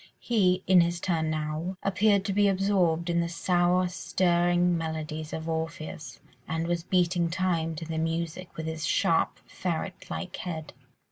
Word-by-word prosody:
He, 185 -6 +2
in 185 -2 +6
his 170 0 0
turn 165 -3 0
now, 155 +4 -3
appeared 195 +1 +3
to 195 - -1
be 205 +1 +4
absorbed 185 -4 +2
in 170 0 +2
the 170 - -2
soul 180 +1 +2
stirring 175 -1 +2
melodies 160 -1 -4
of 160 0 -5
Orpheus, 160 -5 -4 0.3
and 160 +1 -1
was 170 0 0
beating 175 -1 +1
time 170 -2 0
to 165 - -6
the 160 0 -3
music 165 +2 -2
with 160 - -4
his 160 0 -4
sharp, 165 - +2
ferret 175 0 -4
like 185 -2 -5
head. 160 -4 -5
170 Hz, 155 wpm, -28 LUFS, 160-185 Hz, 0.3 s, in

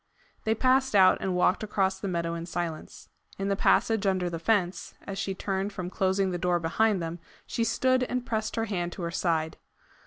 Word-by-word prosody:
They 220 0 +2
passed 260 0 +2
out 190 -2 +6
and 190 -1 -1
walked 180 +1 +2
across 195 -3 0
the 200 - -4
meadow 170 -2 -1
in 170 0 -5
silence. 170 -3 -5 0.3
In 195 0 -2
the 200 - +2
passage 215 +1 +2
under 185 -2 0
the 165 - -4
fence, 185 -1 0
as 195 0 -6
she 195 -1 -2
turned 195 +1 -2
from 185 -2 -5
closing 190 0 +1
the 175 - -3
door 175 0 +1
behind 190 +3 +1
them, 165 +1 -5 0.3
she 230 - -1
stood 255 +3 +2
and 250 0 -3
pressed 220 -2 -2
her 225 - 0
hand 175 -5 -3
to 180 - -6
her 170 - -2
side. 160 -2 -1
190 Hz, 205 wpm, -28 LUFS, 175-215 Hz, 0.3 s, out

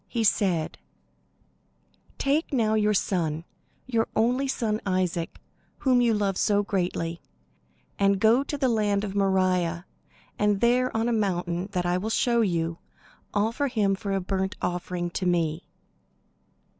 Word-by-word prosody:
He 230 -2 -1
said: 185 -6 +1 1.4
"Take 290 +5 0
now 225 -5 +2
your 210 -1 +3
son, 165 -5 -1 0.4
your 230 -3 0
only 250 +5 +2
son 220 -5 -1
Isaac, 185 -3 -1 0.4
whom 255 -3 +3
you 235 -2 +3
love 200 -2 0
so 205 -1 +2
greatly, 175 -4 -2 0.8
and 200 -1 +3
go 225 +5 +5
to 290 +1 -4
the 270 -2 +1
land 210 -4 +1
of 200 -2 -4
Moriah, 185 -3 +1 0.5
and 210 -1 +2
there 245 +2 +3
on 225 +1 +1
a 240 - +1
mountain 180 -4 -1
that 180 -2 -1
I 175 +1 +1
will 215 +4 -3
show 235 +1 +2
you, 170 -4 -1 0.5
offer 225 +7 0
him 215 -6 +1
for 200 0 -4
a 195 - +1
burnt 190 0 -2
offering 175 0 -3
to 185 +1 -2
me." 165 -2 0
200 Hz, 145 wpm, -26 LUFS, 180-225 Hz, 1.4 s, go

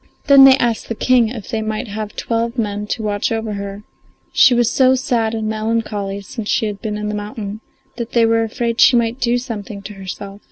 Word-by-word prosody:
They 280 - +5
then 270 0 +10
asked 235 -2 -1
the 230 - -2
King 245 0 +3
if 225 -4 -8
they 225 - -1
might 215 +2 -3
have 210 0 -6
twelve 230 +1 -2
men 210 -2 -2
to 220 - -3
watch 205 0 -1
over 225 -1 -2
her; 200 0 -6 0.5
she 250 - +6
was 240 -1 +3
so 260 -1 +4
sad 230 -3 0
and 220 -1 -2
melancholy 215 -2 -2
since 210 +2 -7
she - - +1
had 205 -2 -5
been 210 -1 -3
in 210 0 -4
the 210 - -3
mountain 210 0 -6 0.4
that 235 -2 -5
they 235 -1 +4
were 225 0 +2
afraid 230 +2 -1
she 250 -2 +7
might 235 +1 +1
do 240 -1 +1
something 215 -5 -6
to 210 - -8
herself. 195 +1 -8
220 Hz, 215 wpm, -18 LUFS, 210-235 Hz, 0.5 s, then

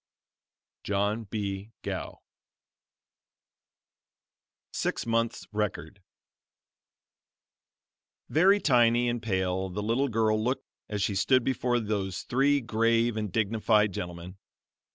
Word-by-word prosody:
John 105 +3 -1
B. 100 0 -4
Gough. - - -5 2.5
SIX - - -2
MONTHS' 115 0 -1
RECORD 105 -1 -3 2.3
Very 190 +6 +4
tiny 120 - +3
and 120 -1 -1
pale 95 -2 -1
the 105 +3 -4
little 120 +6 +1
girl 110 -1 +1
looked 125 +3 -1 0.2
as 105 -2 -1
she 100 - 0
stood 130 +6 +3
before 125 -1 0
those 100 -4 -3
three 140 +3 +2
grave 115 0 +1
and 105 -3 -3
dignified 105 -1 +2
gentlemen. 90 +2 -7
110 Hz, 95 wpm, -28 LUFS, 100-120 Hz, 2.5 s, Very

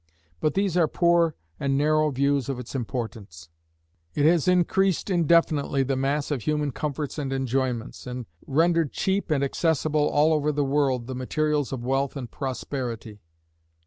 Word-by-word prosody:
But 150 - 0
these 195 -3 +1
are 165 -3 +4
poor 170 -1 +2 0.2
and 135 -1 0
narrow 155 +1 +3
views 140 0 0
of 135 - -2
its 125 -1 -8
importance. 110 - -5 0.7
It 145 - +2
has 165 0 +4
increased 180 +1 +2
indefinitely 160 -5 +2
the 135 +1 -1
mass 140 +3 -1
of 140 -5 -1
human 150 +2 0
comforts 150 +2 -4
and 135 -2 -3
enjoyments, 130 -2 -2
and 125 -1 -5 0.2
rendered 165 +1 +2
cheap 195 0 -1
and 145 -3 +1
accessible, 155 0 +1
all 155 +2 +3
over 150 -1 +1
the 145 -1 0
world, 135 -3 +1
the 130 - -5
materials 145 +3 -1
of 125 -3 -4
wealth 135 +2 0
and 125 -4 -6
prosperity. 125 -5 -5
140 Hz, 155 wpm, -25 LUFS, 130-155 Hz, 0.7 s, are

